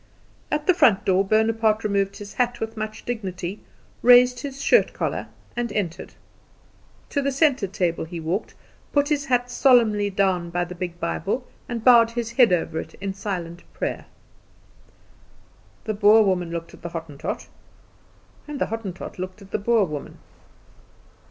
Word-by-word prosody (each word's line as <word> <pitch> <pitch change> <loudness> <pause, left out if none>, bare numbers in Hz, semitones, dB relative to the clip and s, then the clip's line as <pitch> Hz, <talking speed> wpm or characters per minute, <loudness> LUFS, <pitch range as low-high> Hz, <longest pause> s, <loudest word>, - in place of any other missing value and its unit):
At 300 0 -1
the 370 - +5
front 215 - +4
door 190 0 +3
Bonaparte 220 +1 +2
removed 200 -1 0
his 205 -1 -9
hat 245 -1 0
with 225 0 -4
much 215 0 -6
dignity, 190 -5 -4 0.4
raised 245 0 +6
his 275 -2 -6
shirt - - +3
collar, - - -3 0.3
and 240 -2 -2
entered. 180 -6 -4 0.9
To 285 - 0
the 280 0 0
centre 275 -6 +2
table 175 -3 -1
he 170 +1 -7
walked, 165 +6 -3 0.4
put 285 0 +2
his 290 -2 0
hat 245 -2 0
solemnly 225 -7 +4
down 190 -3 0
by 175 +1 -1
the 180 - -8
big 175 -1 -6
Bible, 250 +8 -2 0.2
and 235 -2 -4
bowed 235 -2 +7
his 235 -1 -4
head 235 -3 +5
over 165 -2 0
it - - -8
in 195 0 -4
silent 180 -4 -5
prayer. - - -3 1.8
The 215 - -2
Boer 210 +1 +6
woman 180 -3 0
looked 170 0 -6
at - - -15
the 170 - -5
Hottentot, 165 -4 -6 1.0
and 295 -1 -5
the - - +2
Hottentot 195 -6 -6
looked 185 +2 -6
at 195 - -17
the - - -1
Boer 225 0 +3
woman. 150 -4 -7
210 Hz, 160 wpm, -23 LUFS, 180-240 Hz, 1.8 s, bowed